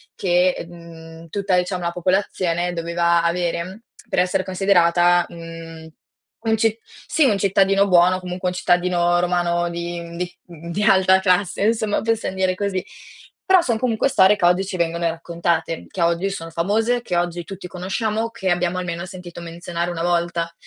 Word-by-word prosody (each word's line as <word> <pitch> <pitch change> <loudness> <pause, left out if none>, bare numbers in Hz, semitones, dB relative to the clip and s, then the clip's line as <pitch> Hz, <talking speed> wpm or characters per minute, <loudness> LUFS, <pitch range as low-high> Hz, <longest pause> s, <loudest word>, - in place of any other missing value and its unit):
che, 180 -1 +1
mhmm, 165 -1 -12
tutta 200 +1 0
diciamo 180 0 -1
la 170 - -1
popolazione 180 -1 0
doveva 170 0 +1
avere 175 +4 -2 0.3
per - - 0
essere 180 +1 +1
considerata, 175 -2 +3
mhmm, 165 -1 -10 0.6
un 220 0 +2
ci 220 0 +2 0.3
sì, 315 - +3
un 210 -6 +3
cittadino 195 0 +3
buono, 180 0 +4
comunque 180 0 -4
un 180 - -6
cittadino 175 -1 +2
romano 175 -1 0
di 170 0 -4
mhmm, 170 0 -9
di 180 0 -5
di 170 +4 -5
alta 190 -2 +5
classe, 185 0 +1
insomma, 220 -2 +1
possiam 225 -4 -1
dire 185 -1 +1
così. 195 -2 -2 0.7
Però 375 -2 +7
son 235 -7 -1
comunque 245 +1 +1
storie 190 -2 +5
che 180 - 0
oggi 180 +2 +3
ci 190 -1 -5
vengono 170 0 -1
raccontate, 165 0 -2
che 180 - -5
oggi 170 +3 +1
sono 165 -4 -6
famose, 220 +8 0
che 180 -7 -2
oggi 175 0 -1
tutti 195 -2 -9
conosciamo, 215 +5 -2
che 190 -5 -2
abbiamo 175 +1 0
almeno 175 0 -4
sentito 180 -2 -9
menzionare 170 +1 -4
1 165 -1 -4
volta. 170 -1 -1
180 Hz, 165 wpm, -21 LUFS, 170-195 Hz, 0.7 s, Però